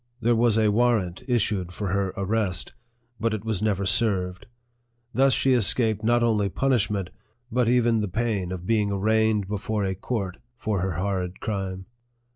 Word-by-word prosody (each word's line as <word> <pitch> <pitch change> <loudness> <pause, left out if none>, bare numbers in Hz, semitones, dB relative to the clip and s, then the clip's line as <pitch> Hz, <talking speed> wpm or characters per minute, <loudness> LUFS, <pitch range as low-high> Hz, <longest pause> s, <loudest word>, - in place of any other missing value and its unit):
There 120 0 +2
was 115 -1 +3
a 110 -1 +3
warrant 110 -6 +1
issued 105 -7 0
for 100 -2 -3
her 100 0 0
arrest, 100 -3 -1 0.5
but 115 -1 0
it 105 0 -7
was 110 -4 -1
never 100 -2 0
served. 95 -4 0 0.7
Thus 135 +1 +4
she 130 0 +3
escaped 110 -2 +2
not 120 +1 +3
only 105 -4 +2
punishment, 105 -6 0 0.4
but 120 0 +2
even 120 -2 +3
the 105 - -1
pain 100 -2 -1
of 90 -1 -5
being 105 -1 +1
arraigned 110 0 +1
before 105 +1 -2
a 95 - -1
court 95 -1 -4 0.2
for 105 -5 -1
her 95 -1 -1
horrid 90 +1 -2
crime. 95 -3 -4
105 Hz, 160 wpm, -25 LUFS, 95-115 Hz, 0.7 s, Thus